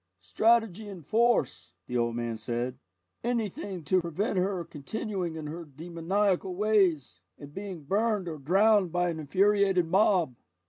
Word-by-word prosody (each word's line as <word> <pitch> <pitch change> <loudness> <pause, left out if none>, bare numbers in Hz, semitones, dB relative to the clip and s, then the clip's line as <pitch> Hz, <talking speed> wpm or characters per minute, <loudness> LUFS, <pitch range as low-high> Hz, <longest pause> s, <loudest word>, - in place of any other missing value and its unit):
"Strategy 220 - +2
and 180 -6 -10
force," 230 - +1
the 125 - -6
old 120 -1 0
man 120 -1 -2
said, 120 +3 -3 0.4
"anything 210 -6 -3
to 185 +5 +2
prevent 170 +6 -2
her 185 -2 -1
continuing 175 +3 -4
in 155 -1 -6
her 165 +3 -6
demoniacal 175 +5 -1
ways, 190 -8 +1 0.2
and 145 0 -12
being 190 -4 -7
burned 205 +3 0
or 160 -3 -5
drowned 195 +5 +3
by 175 +1 +1
an 160 - -6
infuriated 195 +3 +2
mob." 180 -4 +3
180 Hz, 140 wpm, -28 LUFS, 155-205 Hz, 0.4 s, drowned